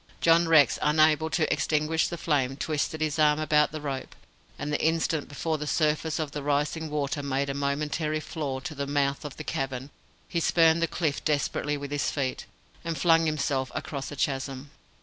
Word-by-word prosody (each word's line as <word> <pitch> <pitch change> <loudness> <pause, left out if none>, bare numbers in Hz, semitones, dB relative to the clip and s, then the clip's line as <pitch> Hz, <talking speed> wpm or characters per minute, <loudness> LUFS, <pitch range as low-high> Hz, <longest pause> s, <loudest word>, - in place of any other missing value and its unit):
John 165 0 +4
Rex, 155 -5 +5
unable 155 +1 +3
to 160 -1 +1
extinguish 155 +1 +1
the 170 - -5
flame, 135 -5 0
twisted 155 +1 -2
his 155 0 -1
arm 150 0 +4
about 150 -1 +3
the 155 - -5
rope, 135 -3 -5 0.4
and 145 +1 -4
the - - 0
instant 160 -1 +1
before 155 +2 -2
the 150 - -4
surface 155 +1 +1
of 155 -3 -3
the 145 - -4
rising 150 +3 -1
water 145 -1 -2
made 140 0 -1
a - - -3
momentary 150 +2 -1
floor 145 -4 -4
to 160 - -5
the 140 -1 -4
mouth 140 -1 0
of 150 -3 -7
the - - -6
cavern, 135 0 -3 0.4
he 170 - -1
spurned 165 0 +4
the 170 - +2
cliff 155 -4 -2
desperately 145 0 0
with 140 0 -7
his 145 -1 0
feet, 135 -3 -3 0.4
and 165 -1 -3
flung 165 -2 +4
himself 140 -3 -1
across 140 -5 -4
the 145 - -7
chasm. 135 0 -3
150 Hz, 190 wpm, -27 LUFS, 140-160 Hz, 0.4 s, Rex